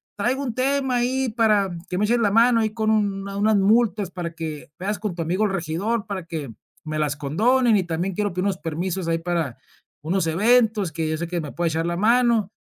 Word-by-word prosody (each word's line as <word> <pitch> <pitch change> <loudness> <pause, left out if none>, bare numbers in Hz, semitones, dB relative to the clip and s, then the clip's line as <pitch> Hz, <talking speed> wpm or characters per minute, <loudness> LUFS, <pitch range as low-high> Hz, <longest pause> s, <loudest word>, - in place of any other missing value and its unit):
"Traigo 250 +7 -1
un 245 - -3
tema 265 0 0
ahí 255 +1 0
para 215 -4 +2 0.2
que 180 - -2
me 210 - +2
eches 240 +2 +2
la 210 -3 +3
mano 230 +2 +5
ahí 220 -1 +1
con 220 -1 +1
un 200 -2 0
unas 205 +2 +1
multas 210 -1 +2
para 175 -2 -5
que 155 -3 -6
veas 200 +3 -3
con 210 -5 -3
tu 170 - -2
amigo 185 +6 0
el 205 - 0
regidor 195 +6 -2
para 190 -4 -5
que 150 -8 -5 0.3
me 155 0 -4
las 150 -1 0
condonen, 220 - +2
y 190 - +1
también 175 +3 -2
quiero 205 +1 -1
pedir 180 +1 -2
unos 195 -2 0
permisos 170 +3 -3
ahí 165 0 +1
para 165 -7 -2 0.5
unos 175 +2 0
eventos 215 +1 +3
que 160 +1 -2
yo 155 - -1
sé 170 - -4
que 175 -1 -2
me 150 - -6
pueda 170 0 -1
echar 165 +1 -1
la 170 - -2
mano 230 -1 +3
195 Hz, 225 wpm, -23 LUFS, 165-225 Hz, 0.5 s, mano